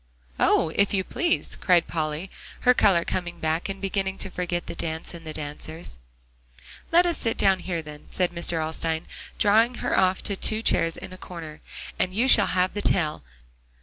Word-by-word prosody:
"Oh! 165 - +3
if 200 0 +2
you 190 - +1
please," 340 - -1
cried 175 -2 +3
Polly, 155 +3 -3 0.3
her 250 - +5
color 190 -8 +3
coming 175 -2 -3
back, 160 +3 -1
and 195 0 -4
beginning 195 0 -2
to 195 - -1
forget 175 -1 -2
the - - -6
dance 160 -1 -3
and 165 -2 -10
the - - -3
dancers. 150 - -6 0.9
"Let 345 +2 +5
us 345 -1 0
sit 225 - -1
down 190 -1 +3
here, 175 -2 -3
then," 150 -1 -11
said 180 -1 0
Mr. 170 -1 -1
Alstyne, 160 +1 -2 0.3
drawing 225 +4 +4
her - - -1
off 185 0 +2
to 200 - -2
two 215 +3 0
chairs 165 -5 +2
in 185 - -9
a 185 - -11
corner, 160 -4 -9 0.4
"and 185 +1 0
you 240 +5 +2
shall 205 -6 +6
have 185 0 +1
the 205 - -3
tale. 155 - +2
180 Hz, 185 wpm, -25 LUFS, 165-195 Hz, 0.9 s, shall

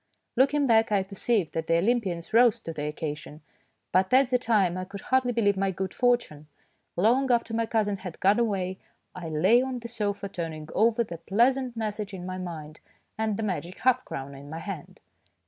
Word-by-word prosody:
Looking 275 +3 +3
back, 225 -3 +4
I 200 -2 +3
perceive 195 -2 -1
that 160 0 -3
the 165 - +3
Olym 230 +8 +2
pians 175 0 -5
rose 235 -1 +5
to 165 - -6
the 150 -1 -4
occasion, 150 0 -6 0.5
but 185 +1 +2
at 260 0 +4
the 250 - +3
time 210 -7 +2
I 185 - -3
could 195 +1 -8
hardly 260 -1 +1
believe 210 -4 +2
my 195 0 0
good 190 0 -4
fortune. 240 - 0 0.5
Long 250 +8 +3
after 235 -1 +1
my 230 0 0
cousin 210 -3 0
had 185 -3 -8
gone 200 +4 +4
away 190 -5 -1 0.3
I 175 -3 -6
lay 185 +11 +4
on 260 -1 -3
the 235 -1 -7
sofa 205 -3 -2
turning 160 -4 -6
over 230 +1 +3
the 170 -6 -8
pleasant 240 +7 +1
message 210 -2 -3
in 180 -1 -7
my 185 0 -5
mind 155 -4 -7 0.4
and 215 -2 -1
the 225 - -2
magic 180 -3 -3
half 255 0 +2
crown 135 +1 -6
in 140 +1 -11
my 160 - -6
hand. 165 -2 -7
200 Hz, 200 wpm, -27 LUFS, 170-235 Hz, 0.5 s, rose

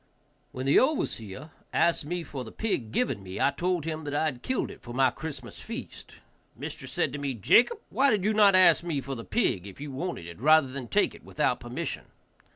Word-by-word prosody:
When 130 +1 -5
the 140 - +6
overseer 150 - -1 0.2
asked 170 -3 +2
me 175 +2 -3
for 135 -5 -6
the 110 - -10
pig 135 - -2
given 115 -3 0
me, 95 -1 -7
I 140 - +3
told 175 +2 -1
him 160 -1 -3
that 145 0 -3
I 155 +1 +2
killed 140 - -3
it - - -13
for 120 0 -9
my 130 -1 +4
Christmas 135 -4 -8
feast. - - -8 0.4
Mistress - - -7
said - - 0
to 145 - -4
me, 140 -2 -2
"Jacob, 235 - +4
why 275 +1 +4
did 205 -5 +1
you 215 - +3
not 205 -2 +6
ask 185 -2 +6
me 165 -5 -1
for 135 0 -5
the 115 -3 -6
pig 100 - 0
if 100 - -11
you 145 0 -6
wanted 150 - -4
it, 85 +4 -10
rather 155 +1 +6
than 130 -2 -6
take - - +2
it - - -15
without - - 0
permission?" - - -5
145 Hz, 215 wpm, -28 LUFS, 125-175 Hz, 0.4 s, the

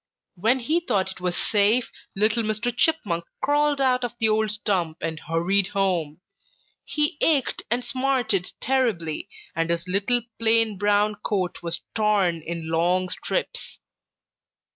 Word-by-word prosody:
When 225 +8 +1
he 310 +8 +1
thought 205 - -1
it 185 - -12
was 180 -1 -1
safe, 215 +4 +3 0.2
little 215 +3 +2
Mr. 220 +2 -1
Chipmunk 220 - +1 0.2
crawled 290 0 +2
out 255 -2 +2
of 245 - -3
the 220 -2 +4
old 215 0 +2
stump 190 -6 -1
and 160 -1 -4
hurried 180 +5 +1
home. 180 -6 -1 0.6
He 300 -1 -1
ached 290 -6 +2
and 245 +2 -1
smarted 245 -6 0
terribly, 225 -13 -1 0.3
and 165 0 0
his 170 +1 -1
little 205 +6 +2 0.2
plain 225 -3 +2
brown 205 +1 +2
coat 185 -4 -1
was 170 -1 -3
torn 205 -6 +2
in 165 0 -5
long 180 +3 +2
strips. - - -3
210 Hz, 140 wpm, -24 LUFS, 180-245 Hz, 0.6 s, the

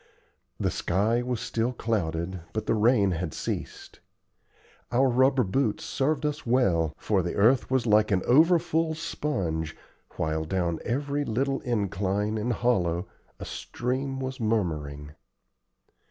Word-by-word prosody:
The - - 0
sky 110 +7 +1
was 125 -1 -2
still 115 +2 -1
clouded, 95 -6 -2
but 110 - -2
the - - +1
rain 110 -2 +3
had 85 -2 -3
ceased. - - -5 0.9
Our 130 +3 +4
rubber 130 +1 +3
boots 110 +2 0
served 150 +2 0
us 150 0 -2
well, 90 - +2
for 100 -3 +1
the 85 0 -3
earth 115 +6 +3
was 130 -2 +1
like 105 -1 +4
an 95 -3 +1
over 160 +7 +6
full 160 -1 0
sponge, 85 - -3 0.4
while 80 0 -1
down 85 0 -1
every 140 +4 -1
little 135 +3 0
incline 105 -1 -1
and 120 +4 -1
hollow 90 -8 +1 0.3
a - - -6
stream 130 +2 -3
was 130 0 -4
murmuring. 75 -10 -2
115 Hz, 135 wpm, -27 LUFS, 90-130 Hz, 0.9 s, over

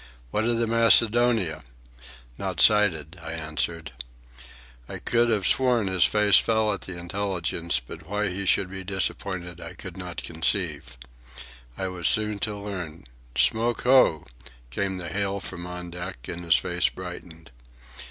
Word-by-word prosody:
"What 110 - 0
of 120 0 +1
the 115 - +1
Macedonia?" 115 -5 +4 0.7
"Not - - -4
sighted," 90 -6 +3
I 80 -1 -6
answered. 80 0 -3 1.0
I - - -5
could 120 0 +1
have 105 -4 +1
sworn 125 -4 +3
his 95 -3 +3
face 105 -1 +5
fell 110 -2 +2
at 100 - -6
the 95 -2 -8
intelligence, 85 -3 -2
but 80 +8 -12
why 105 0 0
he 95 +1 -4
should 95 0 +2
be 95 0 -6
disappointed 95 -2 -3
I 85 +2 -8
could 95 -1 -9
not 90 -2 -6
conceive. 80 -5 -2 0.8
I 95 - -2
was 90 -3 0
soon 105 -1 +4
to 105 0 -3
learn. 90 -6 -6 0.3
"Smoke 115 +1 +2
ho!" 125 - +4 0.5
came 95 +5 -2
the 85 -2 -5
hail 100 +1 -1
from 90 -2 -7
on 90 0 -7
deck, 90 -6 -7
and 85 0 -6
his 85 - +5
face 90 0 +1
brightened. 90 -4 -10
95 Hz, 150 wpm, -25 LUFS, 85-105 Hz, 1.0 s, face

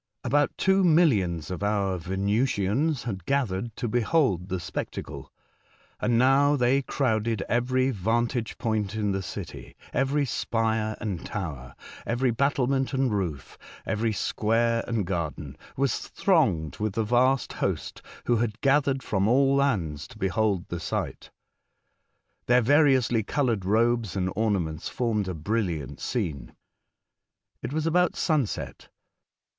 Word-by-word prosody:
About 145 +4 +2
two 190 0 +3
millions 105 - +3
of 90 - -4
our 100 -2 0
Venusians 105 - 0
had 95 -7 -4
gathered 115 -5 -1
to 125 - -3
behold 115 - +1
the 95 - -2
spectacle, 85 - -6 0.7
and 120 -1 +1
now 135 +4 +4
they 130 +1 +2
crowded 115 -6 0
every 130 +2 +1
vantage 115 +3 -1
point 110 -3 -1
in 105 -2 0
the 95 0 -1
city 90 - -8
— - - -22
every 140 +2 +1
spire 110 -3 -1
and 100 -6 -4
tower, 70 -11 -6 0.3
every 120 +2 0
battlement 135 +1 +1
and 130 -2 +1
roof, 85 -9 -4 0.3
every 110 +1 0
square 115 +2 +1
and 115 -5 -1
garden, 85 -6 -4 0.2
was 135 -3 +1
thronged 110 - +1
with 105 -1 -2
the 110 - 0
vast 125 +4 +2
host - - -3 0.2
who 120 - +2
had 115 -1 -2
gathered 135 -1 +2
from 100 -1 0
all 135 +3 +4
lands 95 - 0
to - - -14
behold 95 0 0
the 85 - -4
sight. - - -4 1.2
Their 125 +1 +5
variously 130 -4 +4
coloured 115 -4 -1
robes 115 0 +1
and 95 -1 -1
ornaments 90 -8 -1
formed 110 -5 -1
a 90 - -3
most 75 - -11
brilliant 90 - -2
scene. 80 - -3 1.1
It - - -5
was 155 +1 -1
about 175 +1 +2
sunset. 150 - -1
115 Hz, 135 wpm, -26 LUFS, 95-130 Hz, 1.2 s, Their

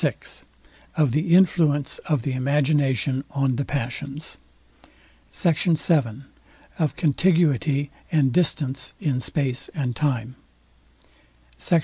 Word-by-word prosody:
VI - - +2 0.8
OF 150 -5 +3
THE 165 +6 +2
INFLUENCE 155 -6 +3
OF 150 -7 +1
THE 135 - -2
IMAGINATION 135 -1 +1
ON 135 -2 0
THE 140 - -1
PASSIONS 140 +3 -4 0.9
SECT. 165 0 +2
VII 135 -7 +1 0.6
OF 155 -5 0
CONTIGUITY 150 -3 +2 0.2
AND 140 -6 +3
DISTANCE 140 -6 0
IN 145 -9 0
SPACE 130 -1 -1
AND 130 -6 -2
TIME 130 -3 -1 1.2
SECT. 165 - +2
140 Hz, 105 wpm, -23 LUFS, 130-155 Hz, 1.2 s, OF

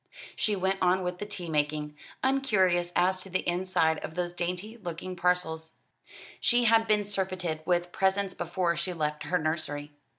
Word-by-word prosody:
She 210 - +1
went 190 0 0
on 185 +1 +3
with 180 0 -3
the 205 - -4
tea 195 -4 -4
making, 150 -1 -1 0.3
uncurious 190 -10 +2
as 185 +1 +3
to 190 - -8
the 185 +1 -1
inside 175 -3 +1
of 160 - -7
those 175 -1 -2
dainty 180 +5 -3
looking 180 -2 -6
parcels. 170 -3 0 0.6
She 240 0 +4
had 225 -1 +4
been 210 -1 +3
surfeited 185 -5 -2
with 175 0 +1
presents 190 +1 +1
before 175 0 -1
she 170 +3 -2
left 150 -2 -2
her 180 - +1
nursery. 150 -2 -2
180 Hz, 165 wpm, -29 LUFS, 165-190 Hz, 0.6 s, She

